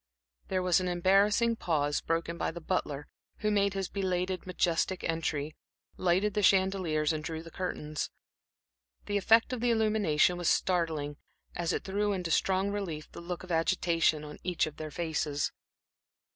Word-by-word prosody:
There 185 -1 0
was 180 0 +4
an 185 - -2
embarrassing 200 +6 +3
pause, 145 -6 0
broken 165 +1 -1
by - - -1
the 170 - -6
butler, 150 -4 -2 0.3
who 210 -1 +1
made 200 -1 +2
his 195 -2 -1
belated, 185 -1 -2
majestic 180 0 0
entry, 155 -2 -2 0.4
lighted 185 +3 +1
the 210 - +1
chandeliers 185 -6 +3
and 155 -1 -3
drew 160 0 -4
the 165 - -11
curtains. 155 -5 -3 1.0
The 205 - 0
effect 225 +5 +4
of 245 - -3
the 245 - +2
illumination 210 -7 +3
was 175 -2 +1
startling, 160 -5 0 0.4
as 170 0 -1
it - - -2
threw 205 +1 0
into 180 -3 -3
strong 190 +4 +2
relief 170 -7 -4
the - - -9
look 175 +1 -5
of 185 - -8
agitation 165 -2 +2
on 150 0 -9
each 180 -2 0
of 155 -1 -8
their 155 -1 -5
faces. 150 -2 -1
180 Hz, 160 wpm, -30 LUFS, 160-195 Hz, 1.0 s, was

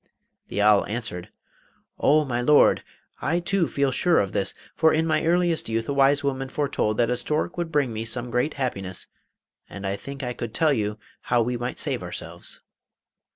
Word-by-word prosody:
The 105 - -1
owl 105 -1 +5
answered: 105 -6 -5 0.7
'Oh, 150 +1 +4
my 120 -2 -1
Lord! 150 +4 +5 0.4
I 165 +4 +1
too 175 -1 +1
feel 140 -1 0
sure 175 +5 +2
of 100 -2 +1
this, 95 -1 -2 0.2
for 160 -1 +4
in 160 +1 +2
my 160 - +1
earliest 170 -4 +2
youth 115 0 -1
a 140 - -1
wise 140 +1 +4
woman 135 -1 -2
foretold 135 -7 -1
that 120 0 +2
a - - +2
stork 150 +7 -1
would 170 -2 -3
bring 140 -6 +1
me 110 +1 -3
some 120 +1 -2
great 125 +6 0
happiness, 100 -9 -3 0.6
and 100 0 -7
I 95 0 -1
think 140 +5 -8
I 125 -1 -2
could 115 -1 -6
tell 160 -3 +3
you 105 -3 -1 0.3
how 120 -1 +4
we 125 +2 -2
might 120 +1 -4
save - - -1
ourselves. - - -6
130 Hz, 190 wpm, -25 LUFS, 115-150 Hz, 0.7 s, owl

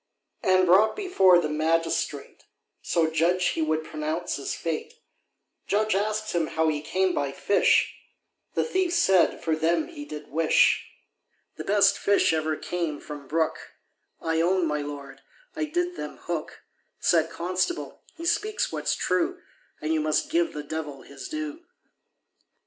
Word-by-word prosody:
And 185 0 +4
brought 195 +5 +5
before 195 - +4
the 170 -3 +1
magistrate, 155 -1 -1 0.4
So 160 -2 +1
judge 175 +3 +2
he - - -2
would 155 0 0
pronounce 155 +3 -3
his 140 - -4
fate, 165 - -4 0.7
Judge 215 +1 +1
asked 215 +2 -1
him 170 -2 +1
how 160 0 +1
he 150 -1 -1
came 185 +3 0
by 140 -4 -1
fish, 200 +8 +3 0.6
The - - +2
thief 375 -6 0
said 195 - +3
for 160 -1 +1
them 170 - +1
he 300 -4 -8
did 150 - -8
wish, 160 +2 +3 0.7
The - - -6
best 200 -1 +4
fish 200 -4 +3
ever 155 -1 0
came 170 -5 -3
from 145 -2 -9
brook, 160 +2 -1 0.5
I 160 0 0
own, 180 +1 +2
my 150 -1 -1
Lord, 145 -1 -8 0.3
I 315 0 -1
did 350 +3 -2
them - - -6
hook, - - -5 0.4
Said 165 -2 +3
constable, 185 - -2
he 335 - -8
speaks 420 +5 0
what's - - -1
true, 360 +2 0 0.4
And 155 +1 0
you 155 - +1
must 155 - 0
give 335 0 +1
the 150 - -5
devil 150 -2 -6
his 140 -1 -9
due. 310 0 -4
170 Hz, 150 wpm, -26 LUFS, 155-215 Hz, 0.7 s, brought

